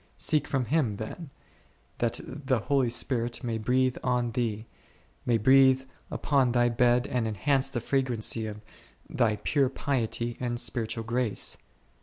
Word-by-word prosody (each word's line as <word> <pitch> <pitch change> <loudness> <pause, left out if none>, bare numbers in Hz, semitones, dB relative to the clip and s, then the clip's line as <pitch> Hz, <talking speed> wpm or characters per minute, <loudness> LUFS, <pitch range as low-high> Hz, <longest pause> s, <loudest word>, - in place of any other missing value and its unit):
Seek 150 -2 +1
from 135 -3 0
Him 125 -5 +1
then, 135 - -7 0.7
that 120 0 0
the 135 -2 -2
Holy 135 -1 +1
Spirit 120 0 0
may 115 -2 -2
breathe 130 +3 +1
on 125 -2 0
thee, 110 -2 -2 0.6
may 120 -2 +3
breathe 130 +3 +5 0.3
upon 135 -4 +1
thy 120 -1 +3
bed 120 +1 +3
and 120 -4 -1
enhance 135 +5 +1
the 120 -3 -3
fragrancy 120 -4 0
of 105 0 -7 0.5
thy 110 -2 +1
pure 135 +4 +1
piety 120 -3 -2
and 120 -1 -2
spiritual 115 -2 -1
grace. 120 -1 0
120 Hz, 140 wpm, -28 LUFS, 115-130 Hz, 0.7 s, breathe